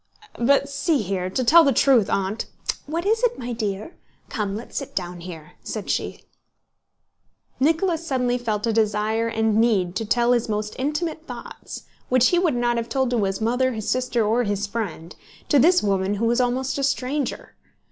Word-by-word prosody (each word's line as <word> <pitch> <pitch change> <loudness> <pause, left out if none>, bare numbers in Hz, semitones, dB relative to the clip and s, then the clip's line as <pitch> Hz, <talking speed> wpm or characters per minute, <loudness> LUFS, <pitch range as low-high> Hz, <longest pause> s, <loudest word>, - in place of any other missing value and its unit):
"But 275 +3 +3
see 280 -1 0
here, 185 -1 -2
to 255 +7 -1
tell 330 +7 +7
the 280 - +3
truth, 250 -4 +4
Aunt..." 195 +3 -1 0.4
"What 330 +4 -3
is 445 +3 +2
it, - - +1
my 245 0 -4
dear? 215 - -4 0.3
Come, 205 -2 -2
let's 225 - -8
sit 275 - -5
down 175 -1 -3
here," 165 -3 -9
said - - -4
she. - - -3 1.4
Nicholas 325 +4 +1
suddenly 250 -3 0
felt 215 -3 -2
a 230 - +1
desire 220 +1 +1
and 220 -1 +1
need 195 -7 +2
to 225 - -2
tell 240 +3 +2
his 240 -1 +1
most 210 0 -2
intimate 315 +4 -2
thoughts - - -8 0.3
(which 255 -1 +4
he 350 - +3
would 340 -7 +1
not 240 0 +1
have 230 0 -3
told 260 +1 0
to 235 -4 +1
his 195 +2 -2
mother, 250 +3 +1
his 215 -2 -5
sister, 250 -3 0
or 225 +4 +2
his 205 -3 -1
friend) 200 -6 -5 0.3
to 290 - +5
this 355 +7 +5
woman 195 0 +1
who 220 +3 -1
was 240 +2 +2
almost 255 +3 -1
a - - -1
stranger. 275 0 -2
235 Hz, 185 wpm, -23 LUFS, 210-275 Hz, 1.4 s, tell